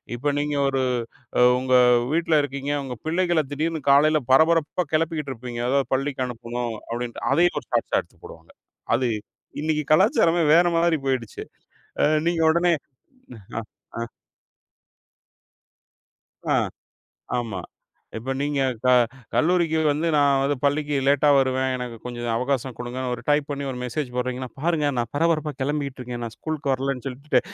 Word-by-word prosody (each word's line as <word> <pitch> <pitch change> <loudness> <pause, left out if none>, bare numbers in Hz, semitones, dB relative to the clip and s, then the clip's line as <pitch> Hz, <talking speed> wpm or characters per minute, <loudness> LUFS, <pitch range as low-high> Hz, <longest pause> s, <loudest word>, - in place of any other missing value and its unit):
இப்ப 145 +4 -1
நீங்க 145 0 -1
ஒரு 135 -1 0 0.6
அ - - +5 0.2
உங்க 130 0 +1 0.4
வீட்ல 165 -1 +2
இருக்கீங்க. 140 0 -4
உங்க 130 -2 -5
பிள்ளைகளைத் 165 -3 +1
திடீர்னு 160 +1 -2
காலையில 155 +2 +5
பரபரப்பா 160 +4 +3
கிளப்பிக்கிட்டு 155 -3 0
இருப்பீங்க. 120 -1 -6
அதாவது 135 0 +1
பள்ளிக்கு 135 -1 -1
அனுப்பணும் 120 0 -4 0.2
அப்டின்டு. 120 0 -4
அதையும் 175 +4 +3
ஒரு - - -24
ஷார்ட்ஷ்ஷா - - +1
எடுத்துப் - - -26
போடுவாங்க. - - -13 0.4
அது 125 0 0 0.5
இன்னைக்கு 150 -1 -1
கலாச்சாரமே 185 - +4
வேற 175 - +6
மாதிரி 165 -2 +2
போயிடுச்சு. 130 -5 -2 0.6
ஆ - - +3 0.2
நீங்க 170 -1 +1
உடனே 170 +1 +3 0.9
ஆ - - -1 0.4
ஆ - - -2 2.5
ஆ - - +3 0.8
ஆமா. 110 -6 -4 0.6
இப்ப 125 +4 -3
நீங்கக் 140 -3 0
க - - +3 0.5
கல்லூரிக்கு 165 -1 +2
வந்து 150 +3 -1
நான் 140 -2 +4
வந்து 140 +1 0
பள்ளிக்கு 145 +1 +1
லேட்டா 145 +1 +4
வருவேன். 130 0 +1
எனக்குக் 120 -3 -7
கொஞ்சம் 120 -1 -5
அவகாசம் 130 0 -2
கொடுங்கனு, 125 +1 -4
ஒரு 120 - -9
டைப் 145 -1 +2
பண்ணி 140 0 -3
ஒரு 125 - -5
மெசேஜ் 125 +1 -3
போடுறீங்கனா, 125 +1 -2
பாருங்க 160 -1 +1
நான் 120 -1 -2
பரபரப்பா 155 0 +1
கிளம்பிக்கிட்டு 140 -2 -2
இருக்கேன். 120 -1 -6
நான் 115 - -7
ஸ்கூல்க்கு 155 -3 -2
வரலைன்னு 135 -1 -2
சொல்லிட்டு 135 +3 0
140 Hz, 140 wpm, -24 LUFS, 125-155 Hz, 2.5 s, வேற